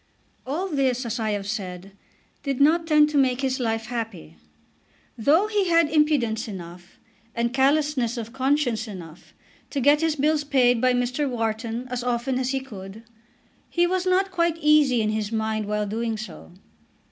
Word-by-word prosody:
All 330 +8 -2
this, 265 -6 0
as 235 +1 -3
I 220 -1 -1
have 205 -1 -2
said, 195 -3 -5 0.5
did 275 -3 -3
not 325 +4 +3
tend 300 -1 +5
to 290 - +2
make 260 -1 +2
his 265 -1 -1
life 225 -2 -1
happy. 220 - -6 0.8
Though 300 - +3
he 415 -3 0
had 335 -3 +3
impudence 285 -8 +1
enough, 175 -2 -10 0.4
and 235 +1 -1
callousness 270 -3 +1
of 230 0 -6
conscience 260 -4 0
enough, 175 -5 -11 0.3
to 280 - -2
get 290 +3 +4
his 325 -2 +1
bills 300 +1 +1
paid 250 -5 +3
by 255 0 +3
Mr. 250 +4 0
Wharton 230 0 -3
as 250 -1 -3
often 250 +1 -1
as 255 -1 -1
he 270 0 -1
could, 210 -4 -10 0.7
he 345 0 +2
was 370 +1 -1
not 380 +1 +2
quite 340 -2 +1
easy 300 -7 +4
in 215 - 0
his 215 -1 -2
mind 220 -1 -1
while 210 0 -1
doing 225 +2 -2
so. 215 -3 -9
250 Hz, 170 wpm, -24 LUFS, 220-295 Hz, 0.8 s, tend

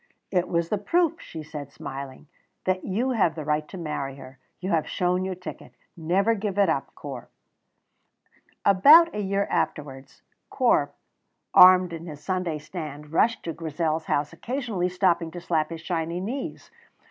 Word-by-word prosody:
"It 180 -2 +1
was 170 -1 0
the 210 - 0
proof," 335 - +1
she 160 -1 -8
said, 145 -2 -8
smiling, 135 +1 -8 0.4
"that 185 0 0
you 235 +7 -1
have 195 -9 +2
the 155 -3 -6
right 150 0 0
to 190 - -9
marry 145 -5 -4
her. 130 -1 -13 0.2
You 185 +2 -3
have 160 -2 +1
shown 180 +1 0
your 190 -1 -3
ticket. 180 +1 -10 0.2
Never 185 +6 +1
give 205 -2 -3
it 200 -3 +4
up, 140 -4 -2
Corp." 135 -4 -8 1.4
About 300 - +7
a - - -3
year 200 0 0
afterwards 135 -2 -3 0.3
Corp, - - +2 0.6
armed 180 -1 +8
in 165 +1 -7
his 150 -2 -9
Sunday 180 -2 -1
stand, 150 -2 -8
rushed 225 +7 +2
to 165 - -4
Grizel's 160 0 -2
house, 145 +2 -1
occasionally 225 -3 -2
stopping 175 -2 +1
to 175 - -8
slap 160 -3 0
his 165 -1 -7
shiny 170 0 -2
knees. 240 +9 -5
170 Hz, 160 wpm, -25 LUFS, 155-195 Hz, 1.4 s, armed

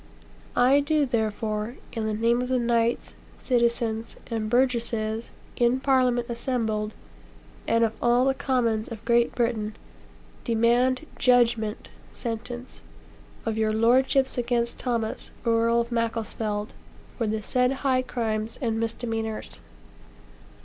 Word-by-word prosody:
I 260 +3 +5
do, 295 0 +2
therefore, 220 -1 -2 0.2
in 225 -2 -2
the 215 - -1
name 230 +2 +2
of 250 - -3
the 260 - +2
knights, 235 -1 +1 0.2
citizens, 235 -2 0 0.2
and 220 -2 -1
burgesses, 230 -3 0 0.3
in 240 +2 +3
Parliament 255 -3 +2
assembled, 225 -3 -2 0.7
and 230 0 +3
of 225 -1 +1
all 240 +2 +4
the 270 - +3
commons 235 -5 0
of 220 -2 -9
Great 235 0 +3
Britain, 220 -3 -1 0.7
demand 245 +4 +2
judgment 235 -4 +2 0.2
(sentence) 240 +1 -6 0.6
of 220 -1 -1
your 215 -1 +2
lordships 260 +4 +3
against 235 -1 -1
Thomas, 230 -3 -2 0.2
Earl 230 0 +3
of 235 +1 -6
Macclesfield, 225 -2 -2 0.4
for 230 - -1
the 215 0 -2
said 250 +3 +2
high 260 -1 +3
crimes 225 -3 -3
and 225 -3 -1
misdemeanors.' 225 - -3
235 Hz, 120 wpm, -26 LUFS, 220-245 Hz, 0.7 s, I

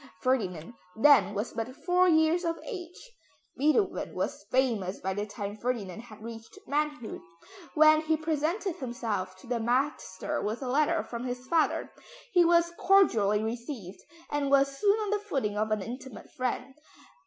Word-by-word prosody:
Ferdinand 195 -8 -1 0.2
then 220 -6 +5
was 210 +4 -3
but 230 +3 -4
four 360 0 +4
years 320 +2 +3
of 330 -1 -1
age. 380 +2 -8 0.4
Beethoven 310 - +1
was - - -3
famous 225 -8 0
by 190 0 -2
the 205 +2 -3
time 205 -1 -5
Ferdinand 220 -4 -3
had 220 -2 -12
reached 225 -1 -9
manhood; 295 -4 -2 0.5
when 310 0 +6
he 315 0 +1
presented 320 +4 -1
himself 230 - -3
to - - -16
the 240 -1 -1
master 245 -4 -1
with 220 +6 -3
a - - -4
letter 305 +5 +2
from 235 0 -6
his 250 0 -4
father, 320 +3 +1 0.4
he 355 -2 +6
was 340 0 +4
cordially 220 - +4
received, 225 - -5 0.3
and 290 -1 0
was 275 0 +3
soon 405 +8 +3
on 420 -1 -2
the 420 - +1
footing 270 - -2
of 215 +1 0
an 215 -2 0
intimate 250 +1 -9
friend. 255 +1 -3
255 Hz, 155 wpm, -29 LUFS, 220-315 Hz, 0.5 s, when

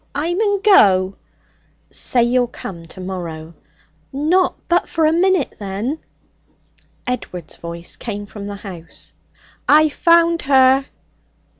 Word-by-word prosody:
'I 315 +5 -1
mun 405 0 0
go!' 195 - +5 0.8
'Say 245 -2 +1
you'll 245 +1 +2
come 170 -7 -9
tomorrow.' 170 -3 -7 0.6
'Not 330 +7 +1
but 350 +1 +1
for 325 -2 +1
a 310 - +3
minute, 365 -3 +1
then.' 210 +9 -3 1.1
Edward's 180 -10 -5
voice 170 0 -8
came 205 -3 -5
from 205 0 -9
the 205 - -5
house. 175 -4 -10 0.6
'I've 305 0 +5
found 335 0 +3
her!' 265 0 +4
250 Hz, 115 wpm, -19 LUFS, -, 1.1 s, go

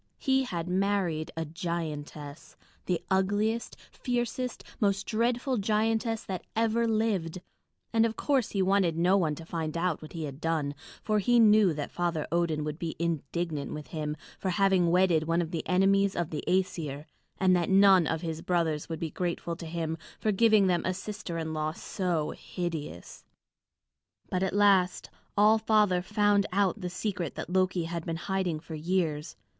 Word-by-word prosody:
He 265 -2 +2
had 170 -6 -4
married 185 -4 0
a 165 - -1
giantess, 155 -3 -5 0.3
the 175 -2 0
ugliest, 205 +4 0
fiercest, 245 0 -3 0.2
most 200 -2 +1
dreadful 240 +3 0
giantess 220 +2 0
that 185 -3 -4
ever 230 +1 +2
lived; 210 -6 0 0.5
and 225 0 +4
of 225 -1 0
course 270 -6 +1
he 195 -2 0
wanted 185 -4 +2
no 180 +3 +4
one 165 -6 +1
to 165 - -10
find 160 -1 -3
out 170 -2 0
what 155 - -10
he 165 -2 -4
had 140 0 -7
done, 160 -3 0 0.3
for 215 -1 +1
he 240 +4 +3
knew 215 -4 +6
that 145 -1 -4
Father 170 -3 -1
Odin 165 -3 +1
would 150 +1 -4
be 165 -2 -3
indignant 165 -2 -2
with 150 -1 -8
him 150 -2 -3 0.2
for 190 - -1
having 185 -1 +3
wedded 175 -3 +3
one 165 +1 +1
of 170 -1 -2
the 165 - -2
enemies 195 +1 +3
of 170 -3 -2
the 155 - -4
Æsir, 160 -6 -1 0.3
and 185 -1 +4
that 175 -2 0
none 190 -3 +6
of 160 -1 -1
his 165 -2 -4
brothers 165 -4 0
would 165 - -4
be 165 -2 -3
grateful 170 -1 -3
to 165 0 -8
him 160 -1 -3 0.2
for 215 - +1
giving 215 0 +5
them 175 -2 +2
a 185 - -1
sister 190 -3 -5
in 160 -1 -3
law 155 0 -1
so 170 -3 -2
hideous. 160 - -6 1.1
But 180 - 0
at 190 0 0
last 195 -3 +3 0.3
All 215 +2 +6
Father 210 -5 +3
found 205 +1 +2
out 200 +2 +1
the 180 - -3
secret 185 -3 -3
that - - -6
Loki 185 -1 +2
had 170 0 -4
been 165 - -3
hiding 180 -2 -2
for 160 - -9
years. 160 -1 -1
180 Hz, 170 wpm, -29 LUFS, 165-205 Hz, 1.1 s, knew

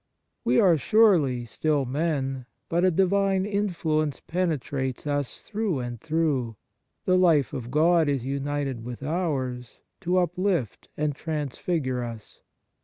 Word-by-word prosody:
We 125 +1 +3
are, 170 -5 +5
surely, 160 - +3
still 145 +4 0
men, 135 -2 -2 0.2
but 170 +1 +1
a 185 - +5
divine 195 +2 +2
influence 165 -8 -1
penetrates 145 -7 -2
us 145 -2 -2
through 210 -6 -2
and 120 -2 -5
through; 150 -8 0 0.5
the 185 - +3
life 160 -7 +3
of 120 -2 -5
God 160 +3 +3
is 135 -4 -1
united 140 -2 -2
with 120 +2 -7
ours 135 -7 -3 0.2
to 180 -1 0
uplift 180 - -1
and 150 -1 0
transfigure 145 -3 -2
us. 115 -3 -9
150 Hz, 125 wpm, -26 LUFS, 130-175 Hz, 0.5 s, are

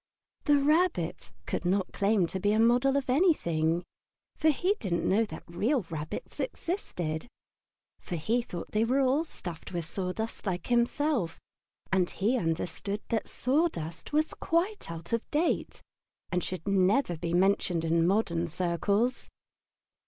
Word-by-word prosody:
The 290 -1 +5
Rabbit 295 - +1 0.2
could - - -2
not 185 +2 0
claim 200 -2 +3
to 190 +3 -4
be 205 +2 +2
a 215 - +2
model 245 +4 +4
of 275 - -1
anything, 175 - +2 0.5
for 315 - +3
he 360 +6 +2
didn't 175 -4 -1
know 220 +4 +3
that - - -9
real 215 - +1
rabbits 155 -1 -6
existed; 175 - -3 0.8
he 195 +9 0
thought 180 -7 -7
they 215 +1 +2
were 255 +4 +2
all 270 +4 +3
stuffed 175 - -8
with 170 -2 -2
sawdust 195 +6 -4
like 180 -2 -2
himself, 240 - +1 0.5
and 185 -2 +3
he 215 +6 0
understood 180 +2 -2
that 225 -2 -1
sawdust 255 - -1
was 305 +1 +1
quite 360 - -1
out 165 +4 -6
of 230 - -1
date 320 +4 0 0.5
and 180 -1 0
should 185 0 -5
never 195 +2 +3
be 170 +2 -2
mentioned 180 -3 +2
in 165 +1 +3
modern 175 -4 +1
circles. 200 +8 0
200 Hz, 140 wpm, -29 LUFS, 170-260 Hz, 0.8 s, The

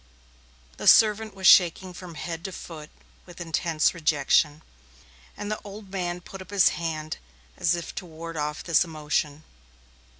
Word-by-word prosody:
The - - -4
servant 215 -1 +5
was 190 -1 -6
shaking 180 +1 +6
from 175 -2 -10
head 165 +1 -5
to 190 - -4
foot 155 -4 -9 0.4
with 175 -1 -13
intense 165 -2 0
rejection, 150 -1 +2 0.7
and 205 +1 -5
the 210 0 -7
man 180 -2 -3
put 195 +2 -10
up 185 - -12
his 200 -2 +5
hand 160 -2 -4 0.4
as 175 +1 +1
if 170 -1 -6
to 180 - -7
ward 165 +1 -8
off 150 0 -3
his 170 -1 +4
emotion. 155 -2 -2
170 Hz, 145 wpm, -26 LUFS, 155-185 Hz, 0.7 s, shaking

